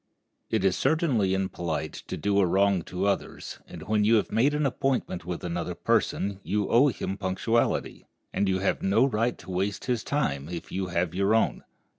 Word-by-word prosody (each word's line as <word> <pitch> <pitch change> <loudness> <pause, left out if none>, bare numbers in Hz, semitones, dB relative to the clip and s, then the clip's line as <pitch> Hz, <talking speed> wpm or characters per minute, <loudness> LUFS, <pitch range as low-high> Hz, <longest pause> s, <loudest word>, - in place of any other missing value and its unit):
It 110 -4 0
is 95 - +3
certainly 130 - +2
impolite 85 -5 -2
to - - -4
do 100 0 +1
a 100 - +5
wrong 100 +1 +3
to 90 +2 -3
others 100 - -2
and - - -9
when 105 0 +1
you 110 +2 +5
have 105 - +1
made 140 +6 +3
an 150 0 +1
appointment 130 -9 -1
with 90 -1 -5
another 85 -1 -3
person 100 0 0
you 100 +2 -1
owe 125 +5 +5
him 100 -5 -3
punctuality, 105 +5 -1 0.3
and 100 - +1
you 95 - +2
have 95 +1 0
no 100 +6 +3
right 120 -1 0
to 90 - -10
waste 95 +3 -2
his 120 -3 -1
time 75 - -1
if 85 -2 -6
you 95 0 -2
have 85 -1 -1
your 100 +4 +2
own. 115 - +1
100 Hz, 190 wpm, -27 LUFS, 90-115 Hz, 0.3 s, a